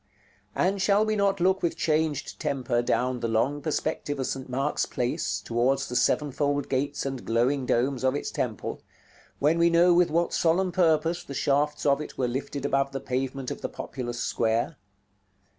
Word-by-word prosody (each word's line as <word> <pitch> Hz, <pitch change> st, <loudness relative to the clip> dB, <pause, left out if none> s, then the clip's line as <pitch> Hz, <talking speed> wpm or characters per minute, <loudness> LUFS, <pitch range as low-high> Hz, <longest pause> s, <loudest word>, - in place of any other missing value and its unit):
And 195 Hz, +1 st, +1 dB
shall 205 Hz, +2 st, +3 dB
we 215 Hz, 0 st, 0 dB
not 200 Hz, -1 st, +1 dB
look 190 Hz, +2 st, +2 dB
with 170 Hz, -, -1 dB
changed 155 Hz, -2 st, -1 dB
temper 125 Hz, -3 st, 0 dB
down 125 Hz, +1 st, 0 dB
the 115 Hz, -, -1 dB
long 130 Hz, +6 st, 0 dB
perspective 145 Hz, -2 st, -2 dB
of 130 Hz, -, -1 dB
St. 130 Hz, 0 st, -4 dB
Mark's 135 Hz, +4 st, -1 dB
Place 125 Hz, 0 st, -1 dB
towards 120 Hz, +4 st, 0 dB
the 125 Hz, -, -5 dB
sevenfold 145 Hz, +3 st, +1 dB
gates 140 Hz, +2 st, -1 dB
and 135 Hz, -2 st, -4 dB
glowing 125 Hz, +3 st, +1 dB
domes 130 Hz, +2 st, +1 dB
of 130 Hz, +1 st, +2 dB
its 145 Hz, -, -3 dB
temple, 110 Hz, -7 st, -3 dB, 0.6 s
when 155 Hz, +4 st, +2 dB
we 170 Hz, 0 st, +5 dB
know 170 Hz, +1 st, +5 dB
with 175 Hz, 0 st, +4 dB
what 170 Hz, +2 st, +1 dB
solemn 180 Hz, +3 st, +2 dB
purpose 165 Hz, -1 st, +2 dB
the 140 Hz, -, -8 dB
shafts 145 Hz, +2 st, +1 dB
of 140 Hz, 0 st, +3 dB
it -, -, -8 dB
were 130 Hz, -, +1 dB
lifted 140 Hz, +3 st, -4 dB
above 135 Hz, 0 st, +1 dB
the 135 Hz, -, -2 dB
pavement 130 Hz, 0 st, -3 dB
of -, -, -6 dB
the -, -, -3 dB
populous 120 Hz, -2 st, -5 dB
square? 115 Hz, +7 st, 0 dB
140 Hz, 175 wpm, -27 LUFS, 125-165 Hz, 0.6 s, we